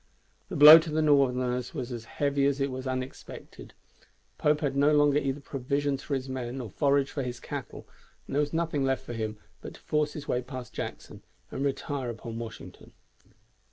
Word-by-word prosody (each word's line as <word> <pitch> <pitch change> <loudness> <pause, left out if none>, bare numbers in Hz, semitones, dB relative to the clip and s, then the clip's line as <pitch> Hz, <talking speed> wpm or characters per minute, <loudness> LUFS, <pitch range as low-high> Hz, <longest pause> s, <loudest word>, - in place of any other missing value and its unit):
The - - -5
blow 150 +3 +11
to 160 0 -5
the 155 +1 0
Northerners 125 -3 +2
was 130 -3 -4
as 115 -2 -6
heavy 140 +2 0
as 140 0 0
it 135 0 0
was 130 +1 -5
unexpected. 130 0 -7 0.6
Pope 150 0 +2
had 140 -3 -1
no 140 +2 +4
longer 145 -1 +4
either 140 0 -3
provisions 140 +1 -2
for 140 - -2
his 130 0 -4
men 130 0 -4
or 115 -6 -6
forage 140 +1 +1
for 140 - -3
his 125 -2 -5
cattle, - - -7 0.4
and - - -6
there 145 - +3
was 145 0 -2
nothing 160 -4 -1
left 135 0 0
for - - -6
him 110 -2 -4 0.2
but - - -9
to - - -15
force 150 -1 -1
his 150 - -8
way 125 - 0
past 130 -1 -8
Jackson - - -7 0.3
and 135 - -3
retire 140 -2 -2
upon 115 0 -6
Washington. 115 -2 -10
135 Hz, 190 wpm, -28 LUFS, 125-145 Hz, 0.6 s, blow